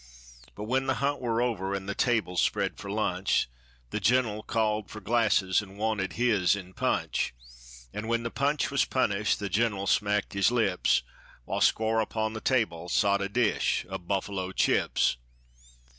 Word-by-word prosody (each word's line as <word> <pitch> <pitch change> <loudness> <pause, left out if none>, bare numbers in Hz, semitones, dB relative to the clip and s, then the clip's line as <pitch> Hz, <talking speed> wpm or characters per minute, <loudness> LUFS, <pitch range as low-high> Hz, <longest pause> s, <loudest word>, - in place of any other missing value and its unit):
But - - -6
when 130 +4 0
the 130 - +2
hunt 140 +3 -1
war 120 -1 0
over, 100 -5 -1
an' 95 -1 -5
the 100 - -3
table 110 -6 0
spread - - +1
for 100 - -7
lunch, 95 -6 0 0.4
The - - -1
gener'l 110 0 +2
called 110 -2 -1
for 110 - -8
glasses, 105 -5 +2
an' 100 -1 -12
wanted 105 -4 -1
his 105 -6 +2
in 95 -2 -9
punch; - - -1 0.6
An' 105 +1 -5
when 115 0 0
the 115 - -3
punch 145 +1 0
was 140 - +3
punished, 105 -5 +1
the 100 - -3
gener'l 100 -1 0
smacked 105 0 +1
his 100 0 +3
lips, 110 - +2 0.4
While - - -3
squar' 110 0 +3
upon 110 0 -2
the 110 - -6
table 90 -10 0
sot 100 0 +2
a 100 - -2
dish 120 +3 +1
o' - - -3
buffalo 95 +1 -3
chips. - - +2
105 Hz, 165 wpm, -28 LUFS, 100-115 Hz, 0.6 s, was